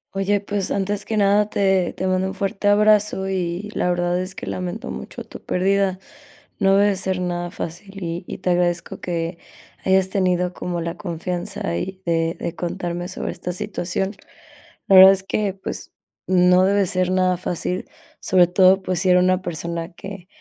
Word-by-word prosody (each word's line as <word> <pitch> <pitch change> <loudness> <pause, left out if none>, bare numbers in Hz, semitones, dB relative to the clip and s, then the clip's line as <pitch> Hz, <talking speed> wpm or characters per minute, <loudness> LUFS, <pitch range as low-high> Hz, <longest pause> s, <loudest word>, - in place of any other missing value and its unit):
Oye, 200 +1 +1
pues, 200 -2 -2
antes 200 +1 -1
que 220 - -2
nada 205 +1 +3
te 190 -3 +2
te 190 - -4
mando 185 0 +1
un 190 - -4
fuerte 195 +1 -2
abrazo 210 -2 +3
y 185 +1 -2
la 180 - 0
verdad 175 0 0
es 185 +1 -6
que - - -7
lamento 180 +3 -4
mucho - - -7
tu - - -12
pérdida. 190 0 +1 0.6
No 195 -1 +4
debe 200 0 +3
ser 185 0 -2
nada 175 -1 -2
fácil, 190 +4 -7
y 170 +1 -4
y - - -6
te 185 - -2
agradezco 175 -1 0
que 170 -1 -3 0.5
hayas 190 0 +3
tenido 180 -2 +1
como 175 -1 -4
la 170 +1 -4
confianza 175 - -4
y 190 - -5
de 165 -1 0
de 170 - -4
contarme 175 0 -3
sobre 185 - -4
esta 180 - -5
situación. 195 0 -3 0.7
La 195 - +8
verdad 190 +1 +11
es 195 0 -4
que, 200 0 -1
pues, 195 - -7 0.3
no 180 0 +5
debe 200 0 +3
ser 185 0 0
nada 185 -1 +2
fácil, 180 +1 -3 0.3
sobre 180 -1 +4
todo, 185 +2 +5
pues, 185 -2 -1
si 185 - +1
era 180 - +6
una 185 0 +2
persona 170 +1 -4
que, 195 0 -9
185 Hz, 175 wpm, -22 LUFS, 175-195 Hz, 0.7 s, verdad